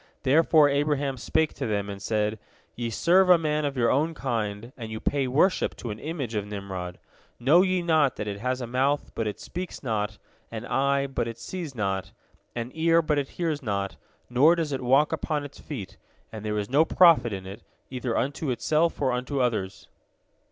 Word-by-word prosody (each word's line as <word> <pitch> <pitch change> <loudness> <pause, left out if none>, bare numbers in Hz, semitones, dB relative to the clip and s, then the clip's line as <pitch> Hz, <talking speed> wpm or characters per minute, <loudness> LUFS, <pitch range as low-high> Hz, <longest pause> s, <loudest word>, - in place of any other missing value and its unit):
Therefore 155 +2 +5
Abraham 145 -1 0
spake 155 +5 0
to 135 - -4
them, 100 -2 -1
and 100 -1 -7
said: 105 +1 -1 0.4
"Ye 120 -1 -3
serve 180 - +3
a 180 - +8
man 150 -2 0
of 140 -2 -3
your 120 -2 +3
own 155 +5 +1
kind, 115 -3 -3
and 115 -3 -7
you 110 - -4
pay 140 +1 0
worship 155 +9 +2
to 120 - -6
an 105 - -7
image 145 -7 -4
of 105 -1 -2
Nimrod. 95 -3 -6 0.4
Know 145 +9 +5
ye 185 -1 +1
not 155 -5 +3
that 105 - -5
it 100 -1 -4
has 125 +3 -2
a - - -3
mouth, 135 +4 0
but 115 - -2
it 105 - -4
speaks 180 -2 -6
not; 105 -4 -2 0.3
an 115 +1 -6
eye, 140 +1 +1
but 135 -4 -2
it 115 -1 -6
sees 170 -4 -6
not; 95 -3 -2 0.4
an 120 +1 -4
ear, 165 +1 +3
but 150 -2 +1
it 140 - -3
hears 160 -4 -1
not; 100 -5 -3 0.3
nor 140 +8 +5
does 165 -3 -2
it 135 - -2
walk 135 +4 +3
upon 150 -3 -2
its 145 - -11
feet, 100 -9 -7 0.3
and 110 -2 -8
there 105 -1 -2
is 105 -1 -2
no 140 +6 +4
profit 160 -9 +5
in 95 -2 -5
it, 100 +4 -9 0.3
either 125 -2 -2
unto 140 +2 -1
itself 155 +6 +1
or 135 -3 +1
unto 125 +3 -2
others?" 110 -7 -1
130 Hz, 200 wpm, -26 LUFS, 110-150 Hz, 0.4 s, a